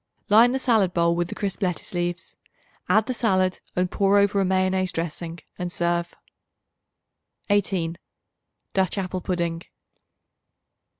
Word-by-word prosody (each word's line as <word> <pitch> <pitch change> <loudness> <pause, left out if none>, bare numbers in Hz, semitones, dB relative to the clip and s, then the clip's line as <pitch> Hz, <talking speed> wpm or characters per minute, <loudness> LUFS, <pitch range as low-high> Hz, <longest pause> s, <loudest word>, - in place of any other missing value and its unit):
Line 225 +4 +7
the 265 - 0
salad 220 -8 +2
bowl 170 0 +3
with 175 0 0
the - - -7
crisp 200 -1 -3
lettuce 180 -2 -2
leaves. 175 0 -3 0.5
Add 215 0 +4
the 255 - -2
salad 185 -6 +1 0.2
and 180 0 0
pour 200 0 +3
over 200 0 +3
a - - +3
mayonnaise 185 0 +1
dressing 165 0 -4 0.2
and 180 0 -3
serve. 170 0 -1 1.4
18. 185 -4 0 0.7
Dutch 190 0 +1
Apple 185 -1 -3
Pudding. 170 -2 -2
185 Hz, 130 wpm, -24 LUFS, 175-200 Hz, 1.4 s, Line